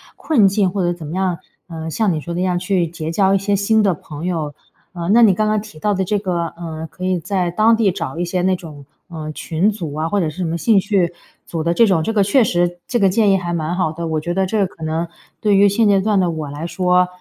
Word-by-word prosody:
困 240 -11 +3
境。 195 -1 +1
或 195 0 -2
者 175 - +1
怎 170 -3 -7
么 155 - -6
样， 185 -2 0 0.3
呃， 160 -2 -6
像 205 +4 0
你 160 - -1
说 170 +3 -6
的 170 - -3
一 185 - 0
样， 180 -1 0
去 180 -1 0
结 160 -1 -5
交 195 +2 +3
一 - - +4
些 200 +1 0
新 215 +2 +2
的 195 -3 +3
朋 150 +1 -8
友。 160 -5 -2 0.4
呃， 170 -1 -5
那 235 - +6
你 220 -4 +7
刚 215 +3 0
刚 215 -1 +1
提 215 -5 -13
到 205 +5 +1
的 190 - 0
这 205 +3 0
个， 175 -4 -2
呃， 160 -2 -6
可 185 - -6
以 185 -1 +1
在 180 0 -1
当 220 +5 +4
地 220 -3 +3
找 165 -5 -5
一 175 - 0
些 180 +1 -1
那 185 +1 +2
种， 150 -5 -11 0.2
呃， 155 -3 -6
群 170 +6 0
组 170 -8 -6
啊， 155 +2 -2
或 205 - +1
者 165 -4 0
是 155 - -11
什 185 - 0
么 165 +1 -2
兴 215 +5 +3
趣 185 -3 0 0.3
组 165 -2 -4
的 170 +1 +1
这 230 +5 +4
种， 170 -5 +2
这 225 - -1
个 210 - +2
确 230 +5 +4
实 175 -2 0
这 240 - +1
个 195 - +4
建 205 +1 +3
议 195 - +4
还 175 -1 -3
蛮 165 0 -2
好 180 -2 0
的。 170 +1 -5
我 160 -1 -1
觉 170 +3 -3
得 190 +1 +1
这 220 - -1
个 195 - +2
可 160 - -13
能 160 +2 -2 0.3
对 210 -2 +2
于 200 +1 +6
现 210 +2 +2
阶 195 -1 +4
段 210 0 +2
的 180 -2 +2
我 155 -3 -4
来 150 +4 -5
说， 180 +1 +2
180 Hz, 305 characters per minute, -19 LUFS, 165-200 Hz, 0.4 s, 你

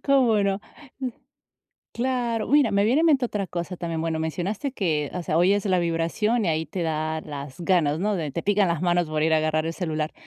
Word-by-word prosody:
¿Cómo 250 -7 +3
no? 195 0 0 1.4
Claro. 240 -2 -1
Mira, 285 -6 +4
me 200 0 +2
viene 255 +8 +3
a - - +3
mente 285 -6 +4
otra 210 -4 -2
cosa 175 +1 -5
también. 165 -2 -3
Bueno, 160 -1 -1
mencionaste 185 - -3
que, 155 - -1
o 180 - -3
sea, 160 - -1
oyes 195 +4 +3
la 185 -2 +3
vibración 170 +7 0
y 175 - +1
ahí 160 0 0
te 170 +4 -4
da 155 -1 -1
las 145 0 -8
ganas, 165 -4 +2
¿no?, 210 +3 0
de 160 -6 -2
te 170 - -4
pican 205 -1 +2
las 170 -1 -1
manos 175 -2 +2
por 155 0 -1
ir 160 +1 +2
a 160 - +5
agarrar 155 0 0
el 165 - -2
celular. 155 -3 -3
175 Hz, 215 wpm, -25 LUFS, 160-210 Hz, 1.4 s, a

